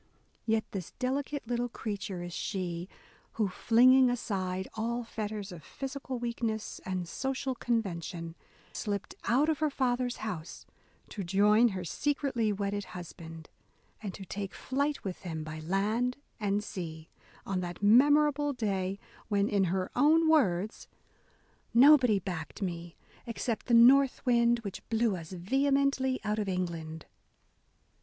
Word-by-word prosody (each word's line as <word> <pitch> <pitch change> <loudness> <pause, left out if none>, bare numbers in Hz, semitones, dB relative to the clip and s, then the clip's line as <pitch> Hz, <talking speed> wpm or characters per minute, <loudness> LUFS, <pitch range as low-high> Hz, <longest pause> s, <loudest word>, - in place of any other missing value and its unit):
Yet 220 0 +2
this 185 -5 -6
delicate 275 +1 -2
little 245 0 -1
crea 215 -2 -4
ture 195 -3 -5
is 175 -1 -7
she 180 -2 -3 0.4
who, 215 -2 +1
flinging 250 +6 +5
aside 190 -6 -2
all 235 +2 -2
fetters 215 -3 -5
of 170 -3 -10
physical 270 - -5
weakness 235 -2 -3
and 185 -2 -3
social 265 +6 -2
convention, 175 -9 -2 0.4
slipped 200 -2 -3
out 270 +6 +3
of 315 -2 +1
her 310 -1 +2
father's 250 -2 0
house 175 -6 -6 0.4
to 200 - -5
join 210 +6 +4
her 190 -5 -3
secretly 265 - 0
wedded 200 0 -2
husband, 165 -2 -10 0.5
and 205 -3 -4
to 195 - -9
take 195 +1 -5
flight 280 +2 -1
with 190 -3 -4
him 160 -3 -5
by 155 0 -6
land 210 +9 0 0.2
and 205 -1 0
sea, 160 -6 -6 0.2
— - - -26
on 195 -2 -1
that 175 +2 -5
memorable 290 +5 +5
day 195 -5 -1 0.3
when, 205 -1 +2
in 200 -2 +2
her 185 +1 -1
own 320 +3 +5
words, 215 - +2 0.9
"nobody 255 -4 +7
backed 180 0 -5
me 170 -2 -5 0.3
except 230 0 -3
the 240 - +4
North 265 +4 +6
Wind 235 -1 +3
which 200 -4 -6
blew 225 -2 +2
us 165 -1 -8
vehemently 270 +7 +1
out 210 0 -1
of 205 -2 -1
England." 165 -4 -3
210 Hz, 140 wpm, -30 LUFS, 185-250 Hz, 0.9 s, nobody